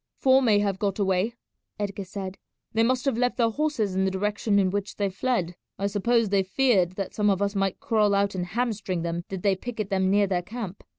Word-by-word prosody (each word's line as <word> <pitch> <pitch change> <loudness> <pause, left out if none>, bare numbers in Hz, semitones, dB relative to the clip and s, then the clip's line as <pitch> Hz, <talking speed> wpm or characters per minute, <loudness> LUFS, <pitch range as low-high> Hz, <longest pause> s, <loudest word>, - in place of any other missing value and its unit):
"Four 265 0 +5
may 220 -5 +4
have 200 -2 0
got 200 -2 -1
away," 195 +3 +1 0.4
Edgar 200 -1 -4
said; 190 0 -6 0.3
"they 225 - +2
must 250 +3 +1
have 270 -4 +1
left 245 0 +1
their 230 -2 +2
horses 260 -8 -1
in 190 +1 +1
the 190 - +2
direction 205 +2 0
in 190 -2 +3
which 200 0 -3
they 200 -2 -1
fled. 190 -4 -1 0.2
I 200 - -2
suppose 215 +2 +1
they 200 0 +3
feared 190 -3 +2
that 195 0 -5
some 210 -1 +2
of 195 -2 +2
us 200 0 0
might 195 -2 -1
crawl 210 -3 +2
out 200 0 +1
and 180 -2 -3
hamstring 200 -4 -2
them 170 0 -3
did 190 -2 -5
they 200 -2 +3
picket 215 0 -5
them 190 -1 +2
near 205 +1 +4
their 185 -2 0
camp. 205 0 -7
200 Hz, 225 wpm, -26 LUFS, 190-225 Hz, 0.4 s, Four